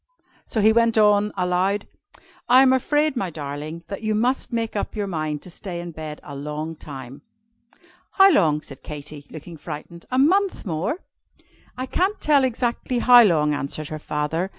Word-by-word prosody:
So 220 - -1
he 220 +2 +5
went 230 0 +3
on, 210 -1 +4
aloud, 185 +3 0 0.6
"I 255 +2 +8
am 260 -1 +5
afraid, 295 +3 +1
my 195 -7 -2
darling, 150 +2 -6
that 200 - -6
you 215 -1 0
must 250 +6 0
make 230 -2 -2
up 205 - -3
your 210 -1 -1
mind 155 -5 -3
to 180 - -10
stay 175 0 -6
in 175 0 -6
bed 155 -1 -7
a 145 - -9
long 150 +3 -5
time." 135 -2 -10 0.9
"How 390 0 +7
long?" 150 - +3
said 135 - -10
Katy, 150 -1 -9
looking 160 +1 -10
frightened: 165 +2 -9
"a 255 - -1
month 370 +7 +2
more?" 180 - -2 0.8
"I 255 - -3
can't 375 +9 0
tell 290 -3 +3
exactly 245 0 -1
how 245 0 +8
long," 155 -7 +3
answered 145 +1 -4
her 155 -1 -5
father. 155 +5 -2
180 Hz, 175 wpm, -23 LUFS, 155-240 Hz, 0.9 s, I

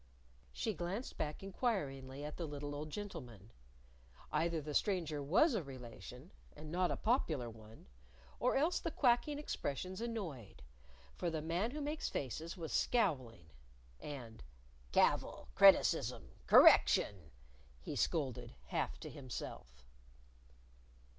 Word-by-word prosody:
She - - -2
glanced 190 +8 -4
back 150 +4 -3
inquiringly 145 - -2
at 150 - -6
the 170 - -3
little 145 0 -5
old 150 +1 -5
gentleman. 125 - -7 0.8
Either 165 0 +1
the 150 0 -6
stranger 165 -5 0
was 195 - +4
a 215 - 0
relation 130 - -10 0.2
and 150 +1 -9
not 180 +1 +1
a - - -1
popular 155 - 0
one 110 0 -14 0.5
or 250 - +2
else 315 +6 +2
the - - -2
quacking 285 +1 +2
expressions 185 - -4
annoyed. 190 - -5 0.5
For 175 - -2
the 160 -1 -2
Man 175 +7 0
Who 300 +4 -5
Makes 300 +2 -2
Faces 155 - -4
was 165 -3 -5
scowling. 130 - +1 0.5
And, 125 -6 -8 0.5
"Cavil, - - +2
criticism, - - +5 0.2
correction!" 90 -7 +6 0.5
he 60 - -6
scolded, 140 -7 -1
half - - -2
to - - -6
himself. 110 - -8
155 Hz, 120 wpm, -36 LUFS, 130-200 Hz, 0.8 s, correction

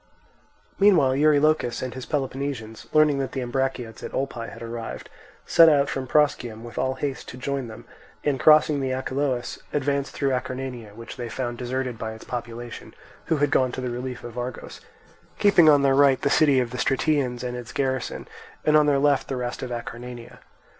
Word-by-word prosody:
Meanwhile 175 -10 +5
Eurylochus 150 -4 +3
and 130 - -4
his 130 -1 -8
Peloponnesians, 135 -5 -4
learning 150 -2 +4
that 135 - -3
the 135 - -2
Ambraciots 125 -2 -3
at - - -7
Olpae 125 -4 -3
had - - -10
arrived, 115 0 -6 0.3
set 165 -1 +7
out 145 -2 +3
from 130 -1 -3
Proschium 125 -6 +1
with 120 0 -7
all 130 0 0
haste 135 0 -4
to 125 - -9
join 135 0 -3
them, 110 -1 -11 0.4
and 140 -3 0
crossing 150 +1 +5
the 135 -1 -1
Achelous 130 -1 -2
advanced 140 -1 -1
through 140 -1 0
Acarnania, 125 -4 -4
which 115 0 -9
they 120 -2 -5
found 120 0 -4
deserted 125 -1 -3
by 110 0 -4
its 110 - -11
population, 120 -1 -7 0.3
who 160 - +1
had 145 -1 +1
gone 130 -3 +3
to - - -4
the 125 -1 -3
relief 125 +1 -5
of 120 0 -7
Argos; 125 0 -6 0.6
keeping 175 -6 +6
on 145 -2 +5
their 135 -1 +4
right 135 -2 +5
the 140 - 0
city 145 -4 +4
of 120 -2 -1
the 125 - -5
Stratians 135 -3 0
and 125 0 -3
its 120 -1 -7
garrison, 130 -2 -2 0.4
and 155 - +4
on 150 -1 +5
their 145 -1 +3
left 140 0 +2
the 135 - -3
rest 125 0 -4
of 130 - -4
Acarnania. 120 0 -7
130 Hz, 190 wpm, -24 LUFS, 120-140 Hz, 0.6 s, set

